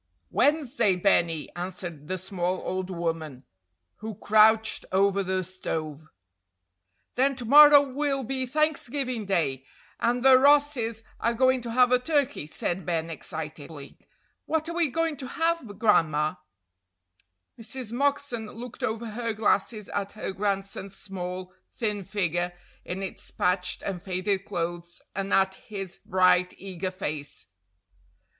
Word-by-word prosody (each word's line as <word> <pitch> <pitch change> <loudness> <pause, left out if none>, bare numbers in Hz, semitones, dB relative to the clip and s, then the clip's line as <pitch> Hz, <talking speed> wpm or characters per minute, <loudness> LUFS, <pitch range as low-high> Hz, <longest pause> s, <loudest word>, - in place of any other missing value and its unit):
"Wednesday, 275 -9 +2
Benny," 170 -4 +1
answered 175 -4 -6
the 185 - -2
small 185 0 -3
old 185 0 -3
woman 165 -6 -3 0.5
who 220 0 -6
crouched 220 +1 +4
over 200 +1 +3
the 185 0 -1
stove. 155 -4 -5 1.1
"Then 270 +2 +2
to 245 -2 -6
morrow 290 +3 +9
will 275 0 -1
be 260 +1 -2
Thanksgiving 270 -5 -1
day, 145 -9 0 0.4
and 240 +2 0
the 260 -1 +8
Rosses 275 -5 +3 0.2
are 235 +1 0
going 260 +1 +3
to 235 -1 -5
have 250 0 +5
a 250 - +5
turkey," 285 - 0
said 175 +4 -3
Ben, 165 -2 -2
excitedly. 155 -2 -7 0.5
"What 320 0 0
are 335 - -4
we 340 -3 +2
going 325 +2 -1
to 260 - -6
have, 330 -1 0
Gran'ma?" 155 -9 +2 1.2
Mrs. 235 0 -5
Moxon 280 -3 0
looked 235 +3 -9
over 225 +1 -2
her 230 +1 -2
glasses 215 0 0
at 200 0 -3
her 215 - -4
grandson's 195 0 -3
small, 185 -1 -6 0.2
thin 210 -3 -2
figure 175 -2 -1 0.3
in 190 +2 -5
its 190 - -7
patched 180 0 0
and 185 -3 -4
faded 190 +1 -1
clothes, 170 0 -4
and 195 +1 -3
at 190 0 +3 0.2
his 195 -4 -5
bright, 185 -2 +3
eager 185 -1 -4
face. 150 -5 -5
200 Hz, 130 wpm, -27 LUFS, 180-250 Hz, 1.2 s, morrow